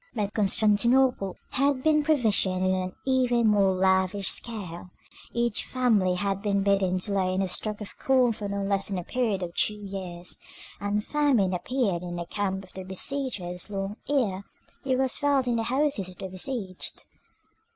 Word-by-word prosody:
But 210 -2 -1
Constantinople 215 +1 +3
had 275 -1 +1
been 310 -1 +4
provisioned 220 -11 +2
on 185 0 +3
an 185 0 -2
even 250 -3 +3
more 200 -2 +4
lavish 190 +1 +2
scale; 185 -7 -4 0.4
each 235 -2 0
family 215 -8 +2
had 195 +1 -1
been 200 -1 +1
bidden 195 -2 +2
to 205 - -2
lay 185 -1 +1
in 195 - +1
a - - -1
stock 210 +4 -2
of 210 - -8
corn 255 -2 +3
for 210 -2 -5
no 200 0 -2
less 195 0 0
a 185 -3 -2
period 225 -3 -1
than 175 -1 -3
two 210 - +1
years, 190 -4 -5 0.4
and 205 +1 -1
famine 270 -11 +2
appeared 200 -2 0
in 175 -1 -5
the 170 0 -4
camp 195 +1 -2
of 185 - -16
the 190 - -6
besiegers 190 -2 -3
long 195 +1 -4
ere 215 -10 +1 0.4
it 260 -1 +1
was 260 -1 +2
felt 285 -2 +2
in 240 -1 +1
the - - +1
houses 265 -8 +1
of 185 - -11
the 190 - -6
besieged. 190 -1 -4
200 Hz, 170 wpm, -27 LUFS, 190-245 Hz, 0.4 s, been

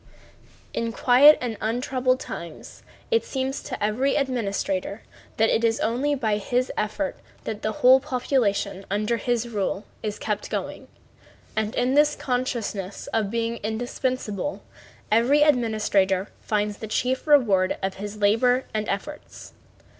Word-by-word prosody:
In 230 0 -2
quiet 260 +6 +7
and 235 -4 -3
untroubled 255 +3 0
times 170 -2 -8 0.3
it 460 0 +3
seems 265 0 -3
to - - -5
every 250 +7 +1
administrator 210 -7 -2 0.3
that 225 0 +3
it 230 - +1
is 225 -1 +2
only 260 +6 0
by 220 -6 0
his 245 +5 -1
efforts 215 +7 -2 0.2
that 215 -1 -5
the 215 - -1
whole 255 +4 +6
population 215 -7 -1
under 210 +4 0
his 240 0 -1
rule 205 -2 -2 0.2
is 210 -1 -3
kept 210 -1 -3
going, - - -4 0.7
and 220 0 -1
in 250 +1 +1
this 295 +1 +4
consciousness 235 -6 -3
of 220 -3 +1
being 230 +1 -2
indispensable 245 +2 -3 0.5
every 250 +7 +4
administrator 210 -8 +2
finds 210 -1 -1
the 220 - -6
chief 255 +6 -1
reward 210 -11 +4
of 190 0 -2
his 205 +1 -6
labor 230 +5 +3
and 215 -1 -2
efforts. 295 +10 -6
230 Hz, 135 wpm, -24 LUFS, 210-255 Hz, 0.7 s, quiet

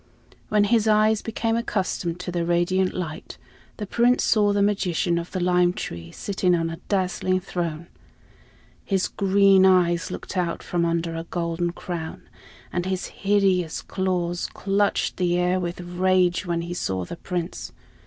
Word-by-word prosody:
When 210 -1 +3
his 220 +1 +2
eyes 215 0 +4
became 225 0 -1
accustomed 185 -6 -2
to 180 - -4
the 170 -1 -1
radiant 175 +2 +1
light, 165 -4 -6 0.4
the 210 - -4
Prince 240 +4 +2
saw 210 -2 +3
the 200 0 +2
magician 180 -4 +1
of 170 - -6
the 185 - -3
lime 180 0 +3
tree 85 - -6
sitting 185 -3 0
on 165 -1 -1
a 165 - -7
dazzling 185 -1 +1
throne. 170 -3 -4 1.0
His 190 -2 0
green 195 -1 +4
eyes 175 -3 +3
looked - - -7
out 175 -2 -1
from 170 -1 0
under 170 0 -1
a 165 0 -5
golden 170 0 -2
crown, 170 -2 -6 0.5
and 175 +1 -1
his 190 -1 -2
hideous 195 -4 +1
claws 180 -2 -2
clutched 200 +1 0
the 175 -1 +1
air 180 +1 +2
with 175 -1 -4
rage 180 +1 +1
when 170 -1 0
he 170 +1 -5
saw 95 - -2
the 170 - -8
Prince. 175 -2 -4
180 Hz, 155 wpm, -24 LUFS, 170-195 Hz, 1.0 s, eyes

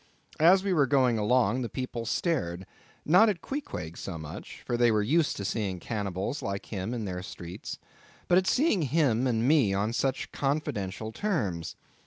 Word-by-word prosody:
As 180 +4 +6
we 195 -2 +1
were 145 -5 +3
going 130 -4 +3
along 120 +2 +2
the 120 - -3
people 120 -3 -4
stared; 130 - -1 0.4
not 185 +8 +6
at 195 -5 -1
Queequeg 90 - -5
so 90 -2 -6
much—for 80 +9 -6
they 120 -1 +4
were 105 -1 +2
used 150 +7 +2
to 100 - -4
seeing 100 -3 -2
cannibals 100 - -3
like 100 0 -4
him 100 +1 -4
in 115 -3 -3
their 90 -2 -4
streets,—but 90 - -6
at 185 0 +3
seeing 260 - +3
him 135 -4 +2
and 115 -1 +1
me 135 -10 +4
upon 105 +4 0
such 135 +1 -1
confidential 110 -8 -2
terms. 110 - -2
120 Hz, 165 wpm, -28 LUFS, 100-150 Hz, 0.4 s, As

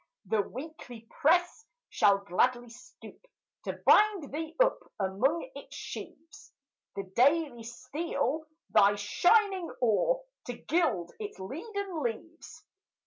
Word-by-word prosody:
The 220 -2 +2
Weekly 245 -1 -9
press 350 +7 +2 0.3
shall 200 -1 +4
gladly 240 +6 +1
stoop 250 - -14 0.4
To - - -2
bind 405 -9 +4
thee 320 +1 -4
up - - +4 0.2
among 260 - 0
its - - -10
sheaves; 295 -3 -9 0.4
The 195 - -3
Daily 280 -1 +3
steal 265 +5 -3 0.2
thy 205 -1 +5
shining 365 - +2
ore, 380 - +2 0.2
To 245 - -3
gild 240 - 0
its 420 -1 -6
leaden 355 - -5
leaves. 295 +7 -6
295 Hz, 110 wpm, -30 LUFS, 230-340 Hz, 0.4 s, thy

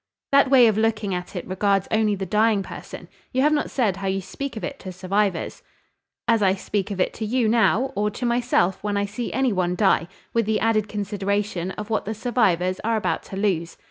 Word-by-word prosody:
"That 280 -1 +5
way 260 -3 +7
of 220 -2 +3
looking 220 -3 0
at 180 +2 -5
it 180 - -4
regards 195 +1 +1
only 215 -1 +2
the 190 0 -4
dying 210 +1 +2
person; - - -9 0.2
you 260 +1 +1
have 300 +1 +4
not 295 - 0
said 215 -8 0
how 195 0 -4
you 190 0 0
speak 240 +7 -6
of - - -6
it 280 - -5
to 185 - -7
survivors." 190 0 -1 0.7
"As 230 -2 +3
I 190 -1 +3
speak 200 +1 -3
of 200 -2 -5
it - - +1
to 225 - -6
you 230 +2 +1
now, 235 +3 +3
or 210 +1 +1
to 245 - -5
myself 235 -6 +1
when 205 -1 -1
I 200 - +1
see 215 +4 -5
any 260 -2 +1
one 180 -1 0
die; 185 -3 +2 0.3
with 230 -2 +1
the 220 -1 +1
added 215 -2 +1
consideration 200 -2 -2
of 210 +1 -7
what 220 - 0
the 220 +2 -3
survivors 190 -6 +1
are 225 +1 0
about 215 - -1
to 195 - -7
lose. 180 -5 -1
210 Hz, 220 wpm, -23 LUFS, 190-225 Hz, 0.7 s, way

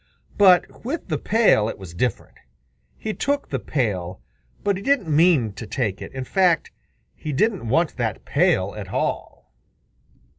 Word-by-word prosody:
But 185 -3 +4
with 270 - -4
the 155 - -1
pail 210 - +3
it - - -6
was 95 -4 -10
different. 115 +5 -3 0.6
He 215 - -4
took 285 +5 -1
the - - -2
pail, 95 - -2 0.4
but 200 -1 +1
he 190 - -6
didn't 205 - +1
mean 150 - +4
to 110 - -8
take 105 -4 -2
it. - - -7
In 130 -1 -5
fact, 180 +4 +2 0.4
he 155 - -6
didn't 190 - 0
want 165 +6 +1
that 115 -3 -3
pail 145 - +2
at 100 -3 -7
all. 95 - -4
150 Hz, 155 wpm, -23 LUFS, -, 0.6 s, But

